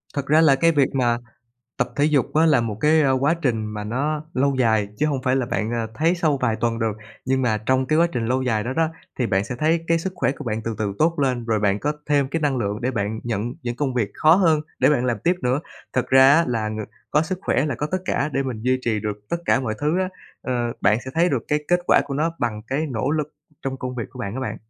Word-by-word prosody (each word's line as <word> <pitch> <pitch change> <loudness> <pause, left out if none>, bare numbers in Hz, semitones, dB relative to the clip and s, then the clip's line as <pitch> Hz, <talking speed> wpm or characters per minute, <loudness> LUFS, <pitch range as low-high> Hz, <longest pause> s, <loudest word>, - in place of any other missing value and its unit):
Thật 140 -2 -2
ra 155 +2 +5
là 145 -4 +6
cái 165 +4 +3
việc 145 -3 +2
mà 120 -2 +2 0.6
tập - - 0
thể 145 - +3
dục 150 -3 +1
á 160 +1 +4
là 145 -6 +4
một 110 -3 -3
cái 155 +1 +4 0.2
quá 150 +5 +3
trình 115 -6 0
mà 105 -1 -5
nó 145 +7 -2
lâu 140 +2 +2
dài, 110 -4 +2
chứ 150 - +2
hông 135 -3 -1
phải 130 +1 +1
là 130 -3 0
bạn, 110 +2 -2
ờ, 115 -1 -1
thấy 160 +6 +2
sau 160 -5 +1
vài 115 -4 0
tuần 115 -1 0
được. 115 -2 0 0.3
Nhưng 130 0 +1
mà 110 -4 +1
trong 130 0 +2
cái 155 +2 +2
quá 170 - +5
trình 115 -2 -2
lâu 130 +2 +1
dài 110 -4 0
đó 130 - -2
đó, 160 +2 +1 0.3
thì 125 - +1
bạn 95 -2 +1
sẽ 125 - -5
thấy 160 +2 +1
cái 165 0 +2
sức 185 +3 -4
khỏe 125 -6 0
của - - -9
bạn 110 -1 -2
từ 115 -1 -2
từ 105 -2 -1
tốt 165 0 +2
lên, 125 -4 0
rồi 110 -2 0
bạn 100 -1 +2
có 145 +7 -1
thêm 145 -2 +2
cái 165 +4 -2
năng 145 -3 +1
lượng 105 -1 -2
để 125 - 0
bạn 110 -2 -2
nhận 115 +1 -3
những 120 -1 -3
công 135 -2 -1
việc 110 -5 0
khó 155 +1 +5
hơn 165 -5 +3 0.2
để - - +4
bạn 125 -4 +2
làm 120 -2 0
tiếp 175 +2 +4
nữa. 125 +3 +1 0.3
Thực 130 - -1
ra 130 +1 +7
á 165 +1 +4
là 110 -3 -1
ng 110 - -5 0.3
có 150 +2 +3
sức 180 +3 -3
khỏe 140 -4 +1
là 145 - -1
có 150 - -2
tất 185 - 0
cả 150 -4 -1
để 135 - +1
mình 125 -5 -4
duy 130 +1 +2
trì 110 -3 0
được 105 0 -4
tất 170 - +1
cả 135 - +3
mọi 110 -4 -2
thứ 155 +5 +1
á. 185 0 0 0.3
Ờ, 120 -2 -1
bạn 105 +3 +3
sẽ 130 - -6
thấy 170 +2 +3
được 130 -8 -1
cái 150 - +2
kết 175 0 +3
quả - - +5
của 140 -1 -5
nó 155 +4 +1
bằng 110 -3 -2
cái 145 +6 -1
nỗ 125 +3 -1
lực 150 -1 -2 0.3
trong 135 0 -3
công 130 -1 -5
việc 120 - -3
của - - -13
bạn 100 +2 -4
á 130 - -4
bạn. 130 - -3
130 Hz, 280 wpm, -22 LUFS, 115-150 Hz, 0.6 s, ra